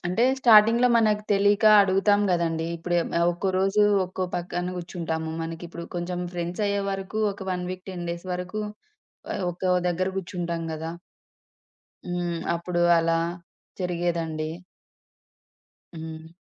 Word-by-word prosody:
అంటే, 180 +6 +1 0.2
స్టార్టింగ్‌లో 230 +1 +6
మనకు 210 -2 +2
తెలియక 205 +1 +3 0.2
అడుగుతాం 195 +2 +3
గదండీ! 165 -2 0
ఇప్పుడే‌ 175 +1 0 0.2
ఆహ్, 170 - +3
ఒక్కో 175 +3 -2
రోజు 195 +2 +3 0.2
ఒక్కో 185 0 -3
పక్కన 175 +1 -3
గుర్చుంటాము. 165 -2 -4
మనకిప్పుడు 170 +1 -6
కొంచెం 175 +1 -3
ఫ్రెండ్స్ 175 +3 -3
అయ్యేవరకు 200 +1 -2
ఒక 200 - -14
1 180 0 -3
వీక్, 185 0 -7
10 175 -2 -5
డేస్ 170 +2 -6
వరకు 185 +4 -4 0.7
ఆహ్, - - -3
ఒక్కో 180 +1 -1 0.2
దగ్గర 185 +2 0
గుర్చుంటాం 175 -2 -4
గదా! 160 +1 -4 1.2
హ్మ్. 175 -1 -2 0.2
అప్పుడు 175 +1 -2 0.2
అలా 165 0 +2 0.6
జరిగేదండి. 170 -3 -2 1.5
హ్మ్. 160 0 -8
175 Hz, 120 wpm, -25 LUFS, 170-195 Hz, 1.5 s, స్టార్టింగ్‌లో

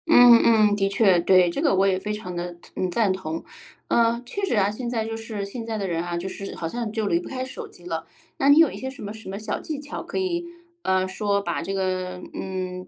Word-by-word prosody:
嗯 245 -7 +8
嗯， 215 -3 +5
的 195 -1 +1
确， 195 -3 +4
对。 180 0 +5
这 170 - -2
个 295 -10 +3
我 195 +1 +4
也 190 -1 +2
非 210 +2 -4
常 200 -4 -5
地， 175 0 -5 0.2
嗯， 185 - -1
赞 195 +1 +2
同。 165 -4 -5 0.4
嗯， 235 +1 +2
确 400 +11 -4
实 355 - 0
啊， 200 -1 +3
现 240 +3 -4
在 225 -2 -1
就 225 0 -4
是 225 -3 -5
现 230 +4 -6
在 225 -1 -3
的 200 -2 -2
人 170 -1 -1
啊， 175 0 -3
就 175 +2 -4
是 195 +1 -6
好 165 - -3
像 230 +4 -3
就 220 -1 -1
离 340 - +2
不 350 - -8
开 255 -1 -3
手 260 - -7
机 175 - -14
了。 165 -2 -4 0.3
那 275 - +3
你 285 - +8
有 325 -3 +6
一 - - -7
些 265 - -4
什 265 - -11
么 205 +1 -5
什 220 -2 -9
么 195 - -4
小 215 - -3
技 305 -3 -5
巧 290 0 -6
可 - - -6
以， 350 -2 -1 0.4
啊， 190 - +2
说 200 +1 0
把 170 -4 -2
这 195 +4 -4
个 185 -1 -2
嗯， 185 -1 -5
205 Hz, 275 characters per minute, -24 LUFS, 185-235 Hz, 0.4 s, 嗯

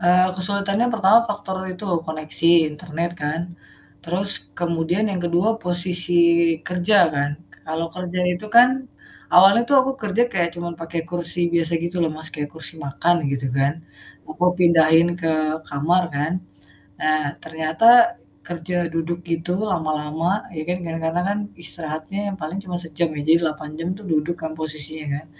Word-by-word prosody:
Eh, 180 +1 +4
kesulitannya 200 +4 0
pertama 215 0 +6
faktor 205 -2 -4 0.2
itu, 180 +3 -9 0.2
koneksi 155 +1 -2 0.2
internet 165 +2 -4
kan. 150 +3 -1 0.6
Terus 185 +4 0 0.3
kemudian 170 +3 0
yang 190 -2 -2
kedua, 175 +4 +2
posisi 175 -1 0 0.5
kerja 180 +4 +2 0.2
kan, 140 0 0 0.4
kalau 160 +1 -2
kerja 180 0 -4
itu 180 +5 -8
kan, 240 +2 +8 0.6
awalnya 195 +5 +7
tuh, 280 - +4
aku 265 +1 -1
kerja 210 +2 +1
kayak 175 -3 +1
cuman 170 0 -4
pake 165 0 -7
kursi 175 -1 -1
biasa 165 -1 +1
gitu 170 +2 -4
loh, 165 - +1
Mas, 155 +1 -6
kayak 145 -1 -4
kursi 160 0 -7
makan, 165 +5 +1
gitu 135 -1 -2
kan, 135 +1 +2 0.5
aku 155 +2 -8 0.2
pindahin 165 -1 +5
ke 165 - -1 0.4
kamar 155 +6 +2
kan. 145 +3 -1 0.7
Nah, 155 0 +2 0.2
ternyata 225 - +4 0.3
kerja 175 +1 -4
duduk 165 +1 -3
gitu, 165 +1 -2 0.2
lama-lama, 160 +3 -1
ya 155 - -3
kan, 180 0 -1
kadang-kadang 165 +1 -2
kan 205 - -1 0.2
istirahatnya 155 +2 -3
yang - - -5
paling 160 +5 -4
cuma 180 -1 -6
sejam 165 0 -2
ya, 150 - -4
jadi 165 +1 +6
8 155 -1 -5
jam, 165 +1 -3
tuh 205 - -12
duduk 160 +1 0
kan 160 - -4
posisinya 155 0 -4
kan. 150 +3 -6
170 Hz, 155 wpm, -22 LUFS, 155-180 Hz, 0.7 s, kan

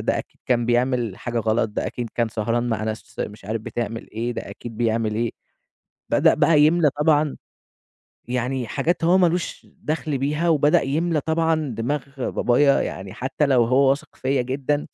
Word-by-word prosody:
ده - - 0
أكيد - - -9
كان 120 -2 +1
بيعمل 120 -3 +1
حاجة 120 +1 -3
غلط، 110 0 +1
ده - - -3
أكيد 120 -2 -5
كان 120 -1 +1
سهران 115 +2 -1
مع 110 -2 -1
ناس 110 0 -6
مش 105 -1 -6
عارف 110 +2 -3
بتعمل 115 0 -5
إيه، 115 +3 -3
ده - - -6
أكيد 115 -2 -9
بيعمل 115 -1 0
إيه، 115 +1 0 0.8
بدأ - - +4
بقى 155 0 +4
يملى 155 0 +4
طبعًا 150 -1 +3 0.9
يعني 125 0 -2
حاجات 170 - -1
هو 175 +3 +5
ما 180 -2 +5
لوش 170 +1 -3 0.2
دَخل 155 -2 -1
بيها، 150 +5 0
وبدأ 150 -2 +4
يملى 155 +3 0
طبعًا 160 -1 0
دماغ 135 +6 -1 0.3
بابايا، 140 +3 +3
يعني 95 0 -5
حتى 130 +4 -1
لو 130 -4 +4
هو 135 +3 +4
واثق 140 +2 -2
فيّا 135 0 0
جدًا 140 +3 -2
130 Hz, 175 wpm, -23 LUFS, 115-150 Hz, 0.9 s, هو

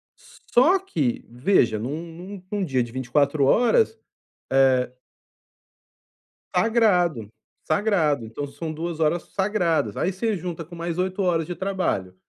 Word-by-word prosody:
só 335 +11 +1
que, 150 - -2
veja, 120 - +2
num 150 +9 -4
num 185 +3 -9
num 205 -2 -1
dia 130 -5 +1
de 120 - -9
24 140 +3 +1
horas, 440 - +3 0.6
eh 130 -2 +4 1.7
Sagrado, 180 - +2 0.3
sagrado. 160 - +1
Então 140 +6 -5
são 160 +3 -6
2 165 +1 -4
horas 160 +2 +1
sagradas, 180 - 0
aí 185 - 0
você 215 +3 -1
junta 170 -1 -5
com 175 +1 -12
mais 170 0 -4
8 185 +2 -1
horas 165 -4 +1
de 175 - -5
trabalho, 185 - -2
170 Hz, 130 wpm, -24 LUFS, 135-195 Hz, 1.7 s, eh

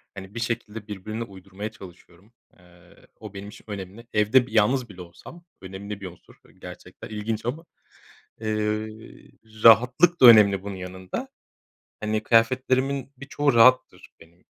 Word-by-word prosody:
Hani, 95 +2 -11
bir - - -4
şekilde 115 -2 -5
birbirine 110 +3 -6
uydurmaya 100 0 -9
çalışıyorum. 95 0 -16 0.3
Eee, 90 -1 -22
o 105 -2 -10
benim 100 +1 -9
için - - -15
önemli. 100 +3 -9
Evde, 110 +4 +3
bir, - - -14
yalnız 115 +3 +1
bile 95 -2 -11
olsam. 90 - -14 0.2
Önemli 100 +2 -8
bir 95 - -6
unsur, 85 -1 -16
eee, - - -21
gerçekten - - -12
ilginç 110 +1 -4
ama, 150 +8 -4 0.8
eee, 110 -1 -2 1.1
rahatlık 125 +10 +5
da 125 - +9
önemli 105 -4 +7
bunun 100 -1 -7
yanında. 95 0 -7 0.7
Hani, 110 0 -2
kıyafetlerimin 130 +4 +1
birçoğu 140 +1 -1
rahattır 130 +2 +3
benim. 85 +2 -21
110 Hz, 140 wpm, -24 LUFS, 95-120 Hz, 1.1 s, da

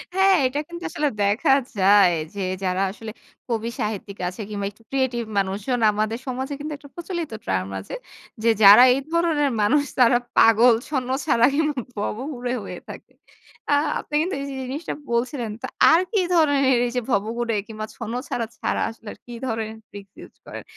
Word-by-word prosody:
হ্যাঁ, 385 0 +5
এটা 270 +3 0
কিন্তু 345 0 -9
আসলে 295 - 0
দেখা 205 +6 +2 0.3
যায় 195 -1 +6 0.2
যে, - - -6 0.2
যারা 185 0 0
আসলে 220 +1 -8 0.4
কবি 230 -1 -2
সাহিত্যিক 205 -1 -4
আছে 185 +4 -6
কিংবা 200 -1 -4
একটু 220 +3 -25
creative 260 -4 -1
মানুষজন, 200 +6 -1
আমাদের 215 +2 -1
সমাজে 260 +2 -3
কিন্তু 300 +1 -5
একটা 285 0 -15
প্রচলিত 345 -3 -5 0.2
term 95 0 -1
আছে 95 - -10 0.5
যে, 230 - +4
যারা 205 +5 +10
এই 265 - 0
ধরনের 330 -4 +2
মানুষ, 285 +8 +3 0.2
তারা 245 -1 +6 0.2
পাগল, 225 +2 +6 0.2
ছন্নছাড়া 260 -3 +1
কিংবা 300 -3 0 0.4
ভবঘুরে 250 -2 -4
হয়ে - - -7
থাকে। - - -11 0.6
আ - - +5 0.3
আপনি - - -12
কিন্তু 355 +4 -2
এই - - -4 0.2
জিনিসটা 275 +6 -5 0.2
বলছিলেন, 240 -1 -1
তো 260 - -4 0.2
আর 330 +2 +5
কি 425 - +2 0.2
ধরনের 280 -5 +3
এইযে 250 +1 -2
ভবঘুরে 230 +3 -1
কিংবা 215 -1 -6
ছন্নছাড়া 235 0 -4
ছাড়া, - - -1
আসলে 225 -2 -10
কি 245 - -10
ধরনের 220 -2 -3
ট্রিকস 200 -1 -12
ইউজ - - -13
করেন? - - -8
240 Hz, 160 wpm, -23 LUFS, 215-280 Hz, 0.6 s, যারা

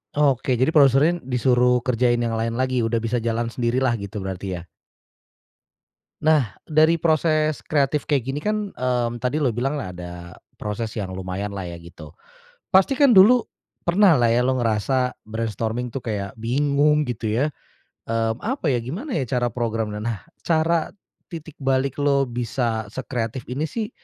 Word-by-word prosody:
Oke 130 -4 +2
jadi 145 +6 +1
produserin 150 +4 +4
disuruh 125 0 +2
kerjain 120 0 +1
yang 115 -1 -1
lain 115 +2 -2
lagi, 130 -2 +1
udah 115 0 0
bisa 115 +1 -2
jalan 115 0 -1
sendirilah 120 +1 0
gitu 100 0 -6
berarti, 95 -1 -4
ya? 85 - -13 1.5
Nah, 150 -10 +3 0.2
dari 155 +1 +4
proses 155 -1 +1
kreatif 145 0 +1
kayak 140 -5 +1
gini 135 - -2
kan, 210 +5 -1
mmm, 120 -1 0
tadi 125 +6 -1
lu 135 - +3
bilang 135 +5 -2
ada 90 -1 -8 0.2
proses 110 +1 -3
yang 100 -4 -4
lumayanlah 95 +1 -4
ya 85 -1 -7
gitu. 85 -2 -12 0.6
Pasti 190 +7 +4
kan 280 0 +5
dulu 230 +4 +7 0.4
pernahlah 170 - +4
ya, 125 +2 +2
lu 130 - +2
ngerasa 125 +2 0
brainstorming 115 +2 -3
tuh 135 - -4
kayak 105 -4 -5
bingung 145 +5 +2
gitu 115 -1 -4 0.2
ya? - - +3 0.6
Mmm, 115 0 -1
apa 220 - -1
ya, 120 - +1
gimana 190 - -6
ya 130 - -3
cara 120 -2 0
program, 115 -3 -2
nah, 110 -1 -4 0.2
cara 165 0 +2 0.4
titik 160 -3 -9
balik 135 +1 0
lo 140 -1 +3
bisa 120 -2 -2
sekreatif 120 +1 -4
ini 150 +4 -2
sih, 225 -1 -4
125 Hz, 150 wpm, -23 LUFS, 115-150 Hz, 1.5 s, dulu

